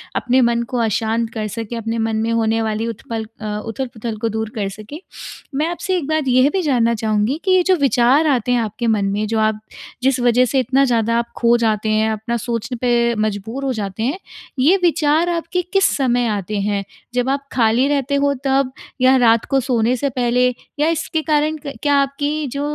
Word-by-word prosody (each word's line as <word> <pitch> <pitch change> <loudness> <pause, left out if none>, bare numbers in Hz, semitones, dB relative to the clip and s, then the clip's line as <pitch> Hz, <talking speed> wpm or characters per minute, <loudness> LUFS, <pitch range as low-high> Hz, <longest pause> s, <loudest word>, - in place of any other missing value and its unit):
अपने 255 +1 +2
मन 235 -1 +2
को 255 - -2
अशांत 225 +1 0
कर 215 -2 -3
सकें, 225 +2 -5
अपने 225 0 -3
मन 225 0 -1
में 225 +1 0
होने 225 0 +1
वाली 220 0 -2
उत्पल 225 0 -5 0.2
अ, 210 -1 -3
उथल-पुथल 230 -1 -5
को 225 +2 -1
दूर 220 0 -3
कर 200 -3 -2
सकें। 215 +9 -9 0.6
मैं 300 +3 +1
आपसे 350 +2 -2
एक 310 -6 -4
बात 315 0 0
यह 255 +2 +4
भी 385 - +1
जानना 245 -7 +2
चाहूँगी 215 +5 0
कि 380 - +2
ये 370 -1 +5
जो 370 +1 +3
विचार 270 +3 +3
आते 250 -4 +1
हैं 245 - +3
आपके 225 +2 -3
मन 215 -3 +2
में 200 +2 -1
जो 220 +1 0
आप 215 -1 +1 0.4
जिस 265 0 +2
वज़ह 245 +1 +3
से 265 +2 +1
इतना 260 +2 +2
ज़्यादा 230 -2 +1
आप 235 0 -1
खो 235 0 +4
जाते 220 -2 0
हैं, 215 +1 +2
अपना 220 +2 -3
सोचने 235 +2 -4
पे 235 -1 +2
मजबूर 220 +6 -5
हो 265 - 0
जाते 205 -1 -4
हैं, 280 +10 -1 0.4
ये 315 +10 +5
विचार 325 0 +2
आपके 340 +1 -1
किस 390 0 +4
समय 245 -3 +1
आते 210 -1 -2
हैं? 200 0 -1 0.3
जब 250 +1 0
आप 280 +1 -2
खाली 235 +2 +2
रहते 280 -1 0
हो 280 0 +2
तब? 270 -1 +2 0.3
या 260 +1 +6
रात 230 -2 +4
को 275 - +3
सोने 245 -2 +1
से 280 +4 -1
पहले? 250 0 +1 0.3
या 300 - +3
इसके 320 -1 -1
कारण 305 0 +1
क 280 - -5
क्या 290 - +3
आपकी 285 +2 0
जो 280 - -3
240 Hz, 210 wpm, -19 LUFS, 220-280 Hz, 0.6 s, या